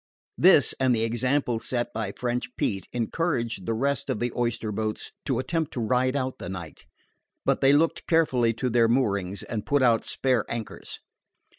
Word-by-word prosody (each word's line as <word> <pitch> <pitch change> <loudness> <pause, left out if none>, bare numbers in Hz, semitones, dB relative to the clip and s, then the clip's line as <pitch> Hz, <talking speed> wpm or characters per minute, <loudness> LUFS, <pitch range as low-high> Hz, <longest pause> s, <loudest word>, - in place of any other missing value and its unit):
This, - - +6
and 130 -2 +3
the 110 - +1
example 120 +1 0
set 120 0 -2
by 110 -3 -3
French 125 0 -3
Pete, 95 -4 -2
encouraged 120 - -2
the 115 - 0
rest 140 +2 -1
of - - -1
the 120 -1 -2
oyster 115 -2 -1
boats 110 +1 -3
to - - 0
attempt 160 +3 -2
to - - -3
ride 125 +3 +1
out 130 -2 -2
the - - -6
night; 85 -5 -8 0.6
but - - +1
they 135 - +6
looked 160 +3 +1
carefully 130 -8 +3
to 125 +2 -2
their 115 0 +4
moorings 100 -6 0
and 110 -3 -4
put 145 -2 +2
out 115 -3 +4
spare 130 -5 +1
anchors. 115 -2 -6
120 Hz, 175 wpm, -26 LUFS, 110-130 Hz, 0.6 s, This